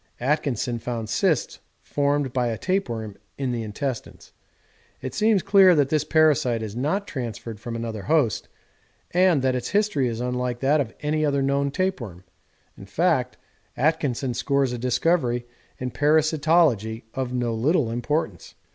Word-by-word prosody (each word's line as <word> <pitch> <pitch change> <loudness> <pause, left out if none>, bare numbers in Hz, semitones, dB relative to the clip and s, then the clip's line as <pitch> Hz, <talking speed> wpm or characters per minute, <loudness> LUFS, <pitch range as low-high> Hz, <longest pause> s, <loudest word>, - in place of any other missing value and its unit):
Atkinson 130 -3 -1
found 115 -2 -4
cysts 165 - 0 0.2
formed 145 -2 0
by 125 -2 +1
a 115 -1 -2
tapeworm 115 - -2 0.2
in 135 -2 -1
the 120 -1 -2
intestines. 115 +4 -5 0.7
It 130 - -6
seems 215 -4 +2
clear 195 -2 +6
that 145 -3 +2
this 155 -1 +1
parasite 145 -8 +2
is 105 -1 -6
not 155 +11 -1
transferred 115 -4 -6
from 115 +1 -6
another 115 -2 -4
host, 140 -5 +1 0.6
and 175 -6 +3
that 130 -1 +2
its 125 -1 -3
history 205 -10 +1
is 115 -1 -3
unlike 125 0 -2
that 145 +2 +3
of 120 -5 -4
any 155 +1 0
other 140 -2 +1
known 140 +1 +1
tapeworm 135 - -3 0.5
in - - -12
fact, - - +1 0.4
Atkinson 135 -4 0
scores 135 +1 0
a 120 - -4
discovery 125 0 +1 0.3
in 125 0 -4
parasitology 150 -5 +2
of 130 -2 -3
no 120 -2 -1
little 125 +2 +1
importance. 120 - -3
130 Hz, 145 wpm, -24 LUFS, 120-155 Hz, 0.7 s, clear